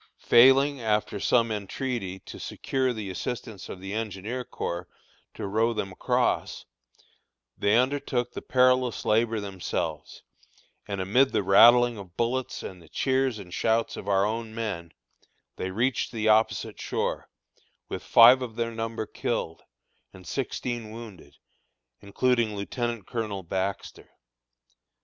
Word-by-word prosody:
Failing, 135 +3 +5
after 105 -2 0
some 115 +2 +2
entreaty, 105 -1 -3
to - - -10
secure 130 -1 -1
the 105 -5 -5
assistance 110 0 -5
of 95 - -7
the 95 +1 -6
engineer 110 +3 -4
corps 90 -6 -5 0.5
to - - -5
row 110 +4 +1
them 95 -2 -3
across, 90 - -1 0.9
they 105 +2 +2
undertook 125 -1 0
the - - -7
perilous 125 -1 +2
labor 115 +1 +2
themselves, 95 -3 -4 0.6
and 100 -2 -3
amid 125 +9 +3
the - - +1
rattling 120 +4 +6
of 95 -3 -12
bullets 125 +2 -1
and 90 -2 -8
the 80 - -18
cheers 130 0 0
and 90 -4 -10
shouts 115 +2 +1
of - - -8
our 100 -1 +3
own 110 +1 -3
men, 100 -8 -4 0.7
they 95 - -3
reached 120 +7 0
the 110 -2 -2
opposite 110 +1 +2
shore, - - -2 0.6
with - - -5
five 125 +3 +7
of 120 -3 -5
their 115 0 -2
number 115 -1 -4
killed, 80 -5 -3 0.5
and 95 -1 -14
sixteen 120 0 -3
wounded, 110 -10 -11 0.6
including 115 +1 +1
Lieutenant 115 +2 -3
Colonel 105 -5 -4
Baxter. 95 +3 -4
110 Hz, 130 wpm, -27 LUFS, 100-120 Hz, 0.9 s, five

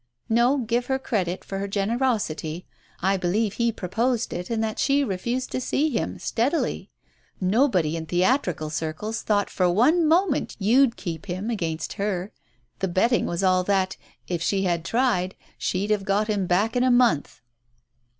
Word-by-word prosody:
No, 240 +5 +3
give 240 -1 -1
her 265 - +1
credit 190 -9 -2
for 195 - -4
her 200 - -2
gener 200 +4 -1
osity, 180 -10 -1 0.4
I 195 +1 +3
believe 195 +4 0
he 235 +1 +1
proposed 230 +5 -1
it 175 +1 -5
and 225 -1 0
that 220 0 -3
she 280 0 +3
refused 235 +4 -2
to 255 - -2
see 295 +5 0
him, 225 - -2
steadily. 265 +8 -1 0.5
Nobody 185 - +2
in 160 -1 -5
theatrical 180 - +1
circles 160 +8 -3
thought 205 -1 +1
for 180 -1 +2
one 300 - +4
moment 335 -1 +2
you'd 235 +5 +3
keep 165 +1 -6
him 190 +5 -3
against 165 -7 -3
her. 195 -1 -2 0.5
The 190 - 0
betting 230 +7 +2
was 170 +2 -2
all 185 -1 +3
that, 190 -1 +1 0.3
if 175 -2 -2
she 195 +3 +1
had 170 -3 0
tried, 220 -5 0 0.2
she'd 200 +3 -1
have 210 -2 +1
got 205 +2 +1
him 205 -4 0
back 205 +7 +1
in 245 - +2
a 255 - +3
month." 245 - +2
205 Hz, 170 wpm, -24 LUFS, 180-240 Hz, 0.5 s, one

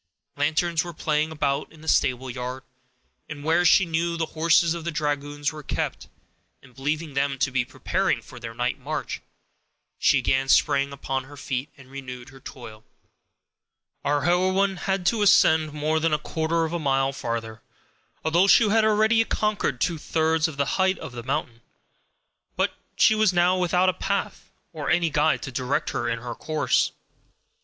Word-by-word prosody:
Lanterns 160 +3 +1
were 175 -2 -8
playing 155 0 0
about 140 -3 -1
in 160 -1 -16
the 160 - -12
stable 130 -3 +2
yard, 125 +1 -5 0.7
where 160 +4 +1
she 190 +2 +5
knew 170 +1 -1
the 165 - 0
horses 165 +1 +3
of 170 -1 -6
the 170 - -2
dragoons 145 -1 -2
were 155 - -8
kept, - - -4 0.6
and 125 -2 -18
believing 150 +4 -3
them 140 0 0
to 135 +1 0
be 125 -1 +1
preparing - - -1
for - - -13
their 115 -1 -8
night 125 +3 -1
march, 150 +3 -4 0.8
she - - +4
again 135 0 +1
sprang 140 0 +3
upon 135 -1 -3
her 145 +1 -13
feet, 135 +1 -3
and 130 -1 -16
renewed 130 -2 -8
her 135 0 -15
toil. 110 -5 -11 1.2
Our 145 0 +1
heroine 185 +2 +2
had 190 0 -2
to 220 +4 +2
ascend 160 -6 +5
more 155 +2 0
than 160 -1 +2
a - - 0
quarter 160 +2 -1
of 160 - -5
a 170 - -1
mile 135 -2 +1
farther, 115 -3 -4 0.6
although 170 +5 +3
she 220 +2 +6
had 220 +1 +3
already 220 +1 +4
conquered 210 - -1
two 170 +2 0
thirds 160 +1 +1
of 155 -3 -8
the 140 - +1 0.2
height 190 0 +2
of - - -8
the 120 -1 -7
mountain. 115 0 -3 0.9
But - - 0 0.2
she - - +5
was 215 -3 +3
now 175 +1 +3
without 180 0 +2
a 185 - +3
path 200 +2 -3 0.2
or 150 -3 -4
any 170 -2 +2
guide 150 +2 +2
to 135 - -5
direct 130 +2 -1
her 120 -1 -2
in 115 - -1
her 120 0 -6
course. 155 -3 0
155 Hz, 175 wpm, -25 LUFS, 135-170 Hz, 1.2 s, she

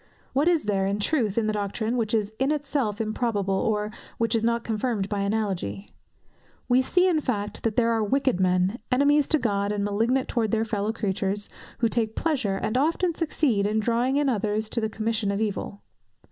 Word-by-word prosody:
What 285 +5 +2
is 340 -3 +3
there, 195 -2 0
in 200 +1 0
truth, 220 -3 0
in 230 - +2
the 215 - 0
doctrine, 210 +3 -2
which 225 -3 -1
is 215 -1 -1
in 265 +1 +2
itself 275 -8 -1
improbable, 215 -3 -1
or 210 +2 0 0.3
which 230 0 0
is 225 -1 +1
not 235 0 +1
confirmed 220 -2 -1
by 205 - -1
analogy? 200 - -2 0.8
We 250 +1 +4
see, 360 +7 +3
in 330 -4 +2
fact, 210 -7 -3
that 225 -2 -1
there 230 -1 +3
are 225 -1 +1
wicked 260 -1 +1
men, 185 +4 +2
enemies 285 +2 +4
to 315 - +3
God, 205 -5 0
and 205 -1 -1
malignant 230 +6 +1
towards 225 -4 -1
their 225 0 +2
fellow 210 -1 -1
creatures, 205 -2 -2 0.3
who 230 - +4
take 225 -1 -1
pleasure, 265 -12 0
and 215 +5 0
often 335 +4 +1
succeed, 295 -11 +1
in 215 +1 +1
drawing 240 +4 +1
in 290 -1 +2
others 215 -2 0
to 230 - -1
the 220 - -1
commission 220 -1 -1
of 200 0 -1
evil. 205 -1 -3
220 Hz, 195 wpm, -25 LUFS, 205-250 Hz, 0.8 s, We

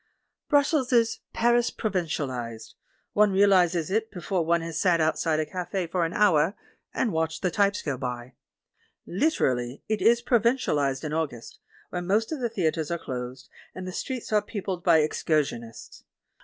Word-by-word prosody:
Brussels 285 -3 +2
is 230 -2 +3
Paris 240 +1 +2
provincialised; 130 - -3 0.4
one 210 -1 +4
realises 185 -4 +3
it 220 +2 0
before 180 -1 -2
one 170 +1 +2
has 165 -1 -4
sat 175 -3 +3
outside 160 0 +1
a 155 - 0
cafe 180 +3 -3
for 170 +1 -1
an 165 - -4
hour 190 -2 +3 0.4
and 230 - 0
watched 160 0 -2
the 180 - +1
types 200 +2 +1
go 140 -4 -2
by. 125 -1 -5 0.7
Liter 290 - +1
ally 120 0 -3
it 215 -1 -1
is 235 +1 +4
provincialised 220 - +1
in 155 -1 -3
August, 145 -8 -4 0.3
when 175 -1 -4
most 215 +6 +1
of 315 - -3
the 240 -2 -1
theatres 165 -7 -1
are 170 - -1
closed, 125 -2 -6 0.3
and 185 0 -6
the - - -4
streets 255 -1 -4
are 210 - +4
peo 205 -1 -6
pled 185 -3 -3
by 165 -3 +5
excursionists. 140 -7 -2
175 Hz, 165 wpm, -26 LUFS, 150-210 Hz, 0.7 s, by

